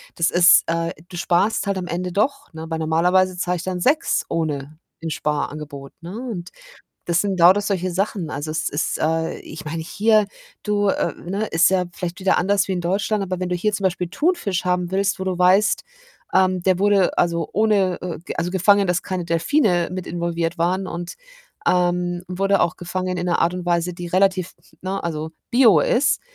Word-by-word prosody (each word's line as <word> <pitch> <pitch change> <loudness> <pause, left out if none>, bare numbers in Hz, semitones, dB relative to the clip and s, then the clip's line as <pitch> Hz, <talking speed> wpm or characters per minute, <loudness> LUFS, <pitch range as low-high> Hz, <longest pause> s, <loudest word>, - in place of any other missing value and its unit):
das 165 - +2
ist 175 0 +6
äh, 165 0 -1 0.2
du 180 - -8
sparst 185 +5 +1
halt 200 -1 0
am 180 -1 -4
Ende 180 +1 -3
doch, 275 +7 -1
ne? 160 0 -7
Weil 160 -1 -2
normalerweise 180 +4 +2
zahle 180 0 -1
ich 170 - -6
dann 185 -1 -3
6 300 - +2
ohne 150 -2 -3 0.3
'n 165 - -2
Sparangebot, 150 -2 -4
ne, 175 +4 -8 0.2
und 175 -4 -6 0.5
das 170 0 +1
sind 195 -1 -1
lauter 180 +4 +6
solche 185 -3 -2
Sachen. 190 -3 -2
Also 150 +2 -4
es 155 0 -1
ist, 145 - -2
äh 160 +1 -1
ich 155 - -10
meine, 160 +2 -4
hier 210 +5 +2 0.4
du, 205 -1 +1
äh, - - 0
ne 200 +5 -4
ist 165 -1 +3
ja 185 -1 +2
vielleicht 175 0 -5
wieder 190 0 +2
anders 195 +2 +2
wie 195 - -2
in 180 - -1
Deutschland. 195 +4 0
Aber 185 -1 -3
wenn 185 0 -2
du 180 - -1
hier 210 +5 0
zum 200 -1 -3
Beispiel 180 -1 0
Thunfisch 210 - 0
haben 180 -1 0
willst, 195 0 0
wo - - -2
du 185 -2 -2
weißt, 190 +4 +3 0.5
ähm, 185 -1 +2
der 185 -1 +2
wurde 200 -2 +3
also, 170 -2 +1
ohne, 200 -4 +2
äh, 180 -2 -4
ge - - -5
also, 175 - -1
gefangen, 195 +1 +3
dass 180 0 +1
keine 185 -2 -3
Delfine 175 - +1
mit 185 -1 -5
involviert 170 0 -2
waren 185 +3 0
und, 170 0 -6 0.5
ähm, 175 0 +1
wurde 195 +2 +1
auch 170 - +1
gefangen 185 +1 -3
in 175 0 -3
'ner 175 - +1
Art 170 +2 +2
und 180 -1 -5
Weise, 175 0 0
die 175 0 -7
relativ, 185 0 +1 0.3
ne 190 +1 -3
also, 160 -1 -3 0.2
bio 235 -8 +6
ist, 265 - +2
180 Hz, 200 wpm, -21 LUFS, 170-195 Hz, 0.5 s, ist